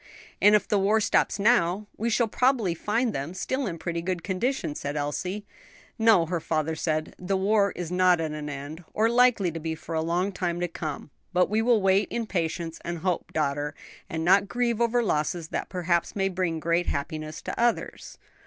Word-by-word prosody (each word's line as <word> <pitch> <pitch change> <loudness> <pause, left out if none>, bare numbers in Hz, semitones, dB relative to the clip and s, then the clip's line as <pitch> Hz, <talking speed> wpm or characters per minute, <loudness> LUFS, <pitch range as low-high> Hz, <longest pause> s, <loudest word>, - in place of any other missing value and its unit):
"And 210 +1 +7
if 210 - +1
the 205 - +2
war 205 +3 +3
stops 210 - +2
now, 205 -3 +3
we 230 +2 -1
shall 230 +1 +2
probably 240 -5 +2
find 220 +7 0
them 145 +7 -4
still 260 +7 -2
in 170 -3 -4
pretty 170 0 -3
good 175 -1 -3
condition," 200 - -1
said 145 0 -4
Elsie. 180 +8 -3 0.5
"No," 220 -6 +5
her 170 +1 -2
father 160 0 -1
said, 155 -1 -2
"the 190 +2 -1
war 200 +1 +3
is 175 -1 -5
not 180 -1 +4
at 160 -1 -2
an 150 -1 -5
end, 145 +4 -7
or 220 +2 +3
likely 235 -6 +4
to 165 - -5
be 160 0 -3
for 165 +1 -8
a 160 - +1
long 175 +4 0
time 175 -2 -2
to 175 - 0
come; 155 -4 -6 0.2
but 180 +2 +2
we 220 +1 +2
will 225 -3 +3
wait 195 +2 +3
in 235 -1 -2
patience 165 -3 -3
and 170 0 -3
hope, 180 +1 -2
daughter, 145 -1 -1 0.3
and 160 0 -3
not 195 +3 +5
grieve 235 0 0
over 235 +1 +2
losses 160 -2 -1
that - - -3
perhaps 175 -2 0
may 195 -1 +1
bring 180 -3 -1
great 170 +2 +1
happiness 155 +2 -3
to - - -5
others." 240 0 -1
180 Hz, 200 wpm, -26 LUFS, 160-210 Hz, 0.5 s, And